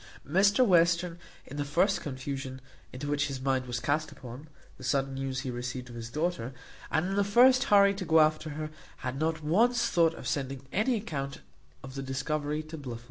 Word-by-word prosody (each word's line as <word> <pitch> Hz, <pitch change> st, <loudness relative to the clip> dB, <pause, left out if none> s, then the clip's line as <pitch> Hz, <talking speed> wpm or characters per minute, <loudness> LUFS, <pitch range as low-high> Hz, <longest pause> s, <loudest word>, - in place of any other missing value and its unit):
Mr 200 Hz, -, +4 dB
Western, 170 Hz, -2 st, +3 dB, 0.3 s
in 145 Hz, -, -9 dB
the 145 Hz, -, 0 dB
first 175 Hz, +8 st, +2 dB
confusion 135 Hz, -1 st, -5 dB, 0.3 s
into 130 Hz, +3 st, -6 dB
which 145 Hz, 0 st, +1 dB
his 135 Hz, -2 st, -4 dB
mind 130 Hz, -1 st, 0 dB
was 120 Hz, -1 st, -2 dB
cast 145 Hz, +6 st, 0 dB
upon 125 Hz, +5 st, -10 dB, 0.3 s
the -, -, -10 dB
sudden 135 Hz, +1 st, 0 dB
news 135 Hz, 0 st, -3 dB
he 130 Hz, -2 st, -4 dB
received 125 Hz, +1 st, -5 dB
of 120 Hz, -, -10 dB
his 115 Hz, -1 st, -6 dB
daughter, 150 Hz, -3 st, -2 dB, 0.3 s
and 155 Hz, -, +1 dB
in 195 Hz, -, -1 dB
the 200 Hz, -, +3 dB
first 250 Hz, +6 st, +5 dB
hurry 200 Hz, -1 st, +6 dB
to 195 Hz, -1 st, -5 dB
go 160 Hz, -2 st, +4 dB
after 155 Hz, 0 st, +3 dB
her, 155 Hz, +1 st, -5 dB, 0.3 s
had 130 Hz, +2 st, -3 dB
not 160 Hz, 0 st, -1 dB
once 235 Hz, +10 st, +3 dB
thought 165 Hz, -1 st, +3 dB
of -, -, -7 dB
sending 135 Hz, -1 st, -3 dB
any 220 Hz, +6 st, +2 dB
account 140 Hz, -10 st, -4 dB, 0.4 s
of 130 Hz, -, -8 dB
the 135 Hz, -, -4 dB
discovery 145 Hz, +3 st, -2 dB
to 155 Hz, 0 st, -8 dB
Blifil. 125 Hz, -5 st, -6 dB
150 Hz, 195 wpm, -29 LUFS, 135-170 Hz, 0.4 s, hurry